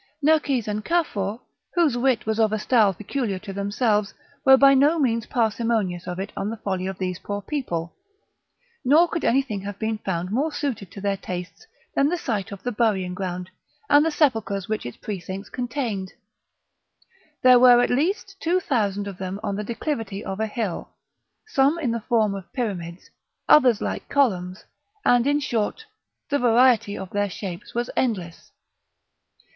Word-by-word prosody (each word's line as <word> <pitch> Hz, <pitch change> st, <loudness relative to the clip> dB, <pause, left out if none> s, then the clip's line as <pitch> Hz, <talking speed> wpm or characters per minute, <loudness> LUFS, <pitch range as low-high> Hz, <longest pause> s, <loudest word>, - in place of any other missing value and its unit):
Nerkes 285 Hz, -6 st, +2 dB
and 210 Hz, 0 st, -2 dB
Cafour, 225 Hz, -, -1 dB, 0.3 s
whose 330 Hz, -8 st, +3 dB
wit 245 Hz, -1 st, +1 dB
was 220 Hz, 0 st, -1 dB
of 220 Hz, -1 st, +3 dB
a 215 Hz, -, 0 dB
style 215 Hz, -2 st, +3 dB
peculiar 210 Hz, +2 st, -3 dB
to 195 Hz, +1 st, -8 dB
themselves, 205 Hz, 0 st, 0 dB, 0.3 s
were 265 Hz, 0 st, +8 dB
by 275 Hz, 0 st, +7 dB
no 285 Hz, +5 st, +4 dB
means 230 Hz, -6 st, 0 dB
parsimonious 220 Hz, -6 st, 0 dB
of 180 Hz, -1 st, -4 dB
it 195 Hz, +2 st, -4 dB
on 200 Hz, -, -2 dB
the 225 Hz, -, -5 dB
folly 190 Hz, -3 st, -3 dB
of 190 Hz, -1 st, -5 dB
these 185 Hz, -1 st, -3 dB
poor 205 Hz, 0 st, -4 dB
people, 185 Hz, -, -4 dB, 0.9 s
nor 305 Hz, +7 st, +5 dB
could 335 Hz, -1 st, -3 dB
anything 240 Hz, -5 st, +1 dB
have 200 Hz, 0 st, -6 dB
been 220 Hz, 0 st, -2 dB
found 185 Hz, -2 st, -3 dB
more 280 Hz, +8 st, 0 dB
suited 255 Hz, -, -3 dB
to 195 Hz, -, -10 dB
their 200 Hz, 0 st, 0 dB
tastes 180 Hz, -1 st, -7 dB, 0.3 s
than 280 Hz, +1 st, +3 dB
the 355 Hz, -, 0 dB
site 220 Hz, -, -3 dB
of 200 Hz, -1 st, -9 dB
the 245 Hz, -, -1 dB
burying 205 Hz, -6 st, 0 dB
ground, 180 Hz, -1 st, -5 dB, 0.4 s
and 290 Hz, +1 st, +7 dB
the 325 Hz, -, +2 dB
sepulchres 225 Hz, -, 0 dB
which 215 Hz, -, -3 dB
its 120 Hz, -, -9 dB
precincts 195 Hz, 0 st, -6 dB
contained; 240 Hz, -7 st, -3 dB, 1.3 s
there 255 Hz, -1 st, +8 dB
were 245 Hz, -1 st, +8 dB
at 245 Hz, -, +2 dB
least 375 Hz, -, 0 dB
two 350 Hz, +3 st, +1 dB
thousand 205 Hz, -, -1 dB
of 195 Hz, -2 st, -8 dB
them 190 Hz, +1 st, -4 dB
on 200 Hz, -2 st, -2 dB
the 210 Hz, -, -3 dB
declivity 225 Hz, -4 st, -4 dB
of 195 Hz, 0 st, -4 dB
a 220 Hz, -, 0 dB
hill: 210 Hz, -4 st, -4 dB, 0.6 s
some 290 Hz, -6 st, +2 dB
in 280 Hz, -8 st, -1 dB
the 230 Hz, 0 st, -2 dB
form 215 Hz, -3 st, +1 dB
of 195 Hz, -3 st, -8 dB
pyramids, 185 Hz, -8 st, -4 dB, 0.4 s
others 250 Hz, -7 st, +6 dB
like -, -, -4 dB
columns, 185 Hz, -9 st, 0 dB, 0.4 s
and, 245 Hz, +1 st, +4 dB
in 290 Hz, +1 st, +3 dB
short, 245 Hz, -, -2 dB, 0.5 s
the 285 Hz, -, +2 dB
variety 240 Hz, -3 st, +4 dB
of 190 Hz, -, -7 dB
their 205 Hz, 0 st, 0 dB
shapes 185 Hz, +1 st, -7 dB
was 240 Hz, 0 st, 0 dB
endless. 185 Hz, -9 st, -2 dB
220 Hz, 170 wpm, -24 LUFS, 195-260 Hz, 1.3 s, were